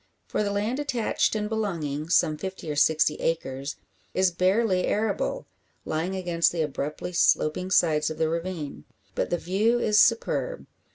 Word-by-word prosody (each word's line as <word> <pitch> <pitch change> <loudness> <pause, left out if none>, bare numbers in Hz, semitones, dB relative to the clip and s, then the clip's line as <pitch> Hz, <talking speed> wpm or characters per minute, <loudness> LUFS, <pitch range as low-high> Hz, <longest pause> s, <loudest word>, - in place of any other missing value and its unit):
For - - -2
the 205 - 0
land 210 +6 -1
attached 250 -7 0
and 210 -1 -1
belonging 165 -9 -3
some 155 -3 +3
fifty 190 -1 -6
or - - -3
sixty 155 +1 +3
acres 140 -4 -2 0.4
is 185 -1 +3
barely 185 +2 +2
arable; - - -1 0.4
lying 165 +5 -2
against 175 -3 +1
the 165 -2 -1
abruptly 150 +4 -4
sloping 180 +1 +2
sides 155 -4 +3
of 155 - -6
the 160 - +1
ravine. 165 -2 -4 0.3
But - - -1
the 175 - +1
view 205 +8 +1
is 210 -3 +3
superb. 240 - +2
180 Hz, 155 wpm, -26 LUFS, 155-210 Hz, 0.4 s, some